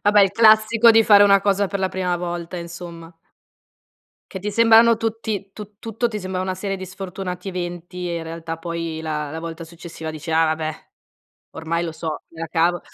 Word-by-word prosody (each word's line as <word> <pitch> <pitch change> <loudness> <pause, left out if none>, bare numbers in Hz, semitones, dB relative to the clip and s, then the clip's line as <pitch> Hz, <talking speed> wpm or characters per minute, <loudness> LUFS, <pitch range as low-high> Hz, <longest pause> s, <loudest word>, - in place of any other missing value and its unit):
Vabbè 205 0 +5
il 195 -1 +2
classico 220 +1 +6
di 225 0 +5
fare 205 -1 +7
una 200 -1 +6
cosa 200 0 +1
per 200 - -3
la 190 - 0
prima 180 -1 -1
volta 175 0 -5
insomma. 170 -1 -8 1.2
Che 190 - -6
ti 210 - -3
sembrano 230 +1 +6
tutti 220 -3 -3
tu 210 -1 -11
tutto 225 +1 -2
ti 215 -2 -4
sembra 185 -1 -4
una 185 0 -2
serie 195 +1 -3
di 190 0 -7
sfortunati 185 0 -6
eventi 175 0 -5
e 170 - -2
in 165 - -4
realtà 165 0 -6
poi 165 -1 -4
la 150 -2 -3
la 160 - -5
volta 165 0 -7
successiva 165 -1 -8
dici: 155 +1 -7
"Ah 160 0 +3
vabbè, 155 0 -3 0.6
ormai 165 +1 -2
lo 165 - -4
so, 160 -1 -5
me 165 0 -12
la 165 - -3
cavo", 175 +1 +1
180 Hz, 195 wpm, -21 LUFS, 165-205 Hz, 1.2 s, fare